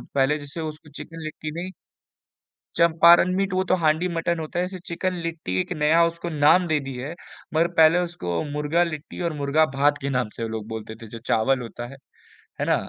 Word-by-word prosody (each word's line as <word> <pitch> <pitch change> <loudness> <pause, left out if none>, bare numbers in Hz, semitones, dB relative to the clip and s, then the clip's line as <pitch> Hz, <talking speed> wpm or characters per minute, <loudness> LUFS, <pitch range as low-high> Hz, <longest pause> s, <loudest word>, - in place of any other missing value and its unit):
पहले 135 +2 +3
जैसे 145 +3 -8
उसको 155 -1 -7
चिकन 165 +3 -9
लिट्टी 155 0 -6
नहीं 185 +1 -5 1.0
चंपारण 170 +2 +6
मीट 195 -1 0
वो 185 0 +2
तो 185 - +5
हांडी 160 +1 +2
मटन 170 0 -1
होता 160 +2 -4
है, 180 - +1
जैसे 185 -1 -8
चिकन 185 +2 -2
लिट्टी 165 -1 -4
एक 180 +1 -7
नया 155 +2 +4
उसको 170 +1 -3
नाम 155 +4 +4
दे 155 -2 +2
दी 135 - -4
है। 135 +6 -5 0.4
मगर 165 +2 +3
पहले 160 +2 +6
उसको 90 - -3
मुर्गा 150 +4 +1
लिट्टी 155 0 -6
और 160 - -3
मुर्गा 150 +2 +2
भात 145 +1 +3
के 140 - -2
नाम 125 -5 0
से 115 - -5
वो 115 - -3
लोग 110 -1 -5
बोलते 110 0 -6
थे 115 - -9
जो 115 +2 -9
चावल 125 +4 +2
होता 120 +1 -7
है, 135 +2 -12 0.6
है - - 0
ना? - - +3
155 Hz, 210 wpm, -24 LUFS, 140-170 Hz, 1.0 s, चंपारण